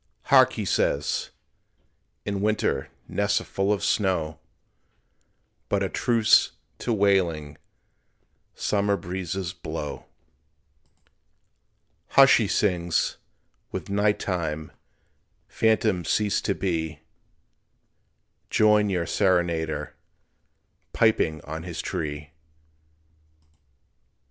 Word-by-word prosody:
"Hark!" - - +7
he - - -4
says, 70 +1 0 1.0
"in 100 -1 -2
winter 110 +1 0 0.2
Nests 100 0 +1
are - - -8
full 95 +1 -1
of 105 - 0
snow, 85 -6 0 1.3
But - - +1
a - - -1
truce 115 -3 +3 0.3
to 120 - -2
wailing 90 -8 +1 1.0
Summer 100 -1 0
breezes 90 0 -4
blow." 80 -4 -6 2.0
"Hush!" 135 0 +7
he 110 - 0
sings, 85 -5 0 0.5
"with - - -6
night 105 +1 +2
time 80 -4 -3 0.8
Phantoms 110 -5 +1
cease 105 -2 +1
to 100 - -1
be, 80 -5 -2 1.5
Join 105 -1 +4
your 90 -3 -1
serenader 85 -6 0 1.0
Piping 80 -9 +2
on 80 +2 -6
his 85 -1 -7
tree." 75 -2 -4
95 Hz, 85 wpm, -25 LUFS, 80-105 Hz, 2.0 s, Hark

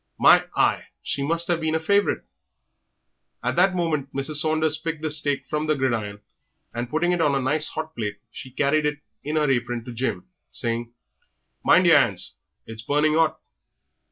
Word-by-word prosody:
"My - - +6
eye! - - +2 0.2
she 140 - -2
must 165 +4 0
have 170 -2 0
been 160 0 0
a - - +1
favourite." 200 +5 +1 1.2
At - - -1
that 185 +1 +4
moment 155 -6 -1
Mrs. 140 +2 -1
Saunders 155 0 +2
picked 160 -1 -5
the 155 - -1
steak 145 -2 +2
from 150 0 -2
the 155 - +2
gridiron, 110 -7 -2 0.5
and 120 +1 -4
putting 165 +5 +1
it 175 -1 0
on 145 -3 +2
a - - +1
nice 150 +4 +1
hot 160 0 -5
plate 105 -3 -4
she 130 - -9
carried 145 +3 +1
it 150 0 -2 0.3
in 150 +2 -3
her 150 -1 +2
apron 120 -2 -2
to 125 - -7
Jim, 125 +3 -3 0.2
saying, 115 0 -2 0.7
"Mind - - +5
yer - - +7
'ands, - - +1 0.3
it - - -10
is 110 - -7
burning 150 +5 +1
'ot." 160 -1 +2
150 Hz, 185 wpm, -24 LUFS, 130-160 Hz, 1.2 s, yer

